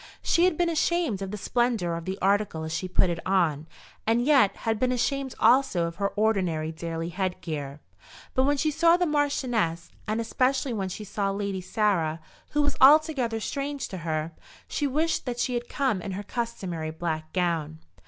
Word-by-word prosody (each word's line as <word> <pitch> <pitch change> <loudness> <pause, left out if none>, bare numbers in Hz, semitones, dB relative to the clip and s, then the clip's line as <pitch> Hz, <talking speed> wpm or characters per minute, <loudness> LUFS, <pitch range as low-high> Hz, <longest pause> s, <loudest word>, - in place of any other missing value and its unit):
She 340 - +3
had 365 -4 +2
been 350 - +2
ashamed 330 - 0
of 195 - -3
the 210 - -5
splendour 225 -4 0
of 165 0 -6
the 190 +1 -3
article 200 -4 +1
as 160 0 -4
she 185 +3 -2
put 185 0 +2
it 170 - -3
on, 165 -6 +1 0.4
and 225 +1 +3
yet 270 -9 +4
had 225 -1 +1
been 255 +1 +2
ashamed 270 +2 -1
also 235 -7 +4
of 170 0 -5
her 200 - +1
ordinary 185 -7 +1
daily 165 0 -4
head 185 0 -2
gear. 145 -3 -5 0.5
But 260 - +2
when 290 +1 +2
she 305 +2 +1
saw 335 +3 +4
the 360 - +1
Marchioness, 250 - 0 0.2
and 215 +2 -1
especially 255 +3 0
when 195 -4 -2
she 210 - -6
saw 200 0 -2
Lady 200 -1 -2
Sarah, 180 -6 0 0.3
who 295 0 +2
was 290 - 0
altogether 275 -5 +5
strange 280 +4 -3
to 190 - -6
her, 160 -1 -2 0.4
she 290 - -1
wished 310 +2 0
that 245 -1 -2
she 250 +1 0
had 240 0 -3
come 260 -9 0
in 195 +1 -5
her 200 +2 -5
customary 195 -8 -4
black 155 -1 -4
gown. 165 -4 -1
210 Hz, 190 wpm, -26 LUFS, 170-265 Hz, 0.5 s, altogether